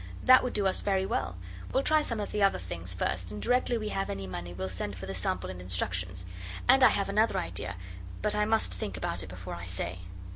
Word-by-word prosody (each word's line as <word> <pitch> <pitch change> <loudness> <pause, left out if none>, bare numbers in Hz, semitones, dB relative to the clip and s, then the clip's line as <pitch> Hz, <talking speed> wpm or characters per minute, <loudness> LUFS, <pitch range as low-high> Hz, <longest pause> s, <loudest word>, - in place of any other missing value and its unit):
That 255 0 +8
would 250 - -2
do 205 - +1
us 190 - +3
very 190 -2 +1
well. 90 - -2 0.3
We'll 265 - +2
try 310 +1 +5
some 230 -6 -2
of 205 - -3
the 210 - -1
other 195 0 +4
things 90 0 -6
first, 90 0 -2
and 105 +1 -6
directly 245 - +2
we 215 -1 -3
have 195 -1 -2
any 95 0 -3
money 85 -2 -5
we'll 95 +2 -4
send 95 +1 -3
for 95 - -6
the 95 - -4
sample 90 0 -1
and 90 -1 -8
instructions. 90 0 -1 0.4
And - - +7
I - - +9
have - - 0
another - - +3
idea, - - -3 0.5
but 210 - +3
I 210 0 +2
must 220 +1 +1
think 95 -3 -4
about 90 0 -2
it 95 - -8
before 90 0 -7
I 85 +1 -6
say. 90 0 -3
95 Hz, 240 wpm, -30 LUFS, -, 0.5 s, I